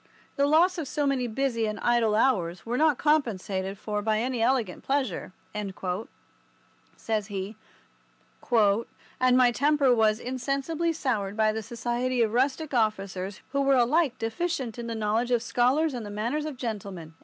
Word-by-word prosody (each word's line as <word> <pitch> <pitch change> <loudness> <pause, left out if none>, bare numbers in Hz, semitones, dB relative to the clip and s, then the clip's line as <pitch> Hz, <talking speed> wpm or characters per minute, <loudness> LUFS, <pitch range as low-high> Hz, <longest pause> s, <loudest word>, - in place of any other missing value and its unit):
"The 280 -1 +2
loss 340 +4 +4
of 310 - -4
so 290 +2 -1
many 265 -3 +1
busy 230 -1 -1
and 215 - -4
idle 235 -3 +2
hours 185 -8 +1
were 235 +1 -2
not 300 0 +3
compensated 200 -10 0
for 210 +1 -3
by 215 0 +1
any 245 +1 -1
elegant 230 -6 0
pleasure," 270 -11 -1 1.7
says 215 -3 -2
he; 200 +1 -5 1.0
"and 235 +3 +2
my 250 -1 +5
temper 280 0 +3
was 220 -2 +3
insensibly 275 +7 -1
soured 225 -10 -2
by 215 0 +3
the 220 +1 -3
society 240 +2 -1
of 220 -1 -1
rustic 275 +5 0
officers, 195 -4 -1
who 280 0 +1
were 275 -1 +4
alike 270 +3 +2
deficient 245 0 -3
in 235 - -5
the 230 - -3
knowledge 220 +3 0
of 240 -2 +2
scholars 265 +6 +2
and 240 -3 -4
the 205 - -7
manners 235 +9 -2
of 290 -4 -6
gentlemen." 200 -9 -5
240 Hz, 155 wpm, -27 LUFS, 215-275 Hz, 1.7 s, my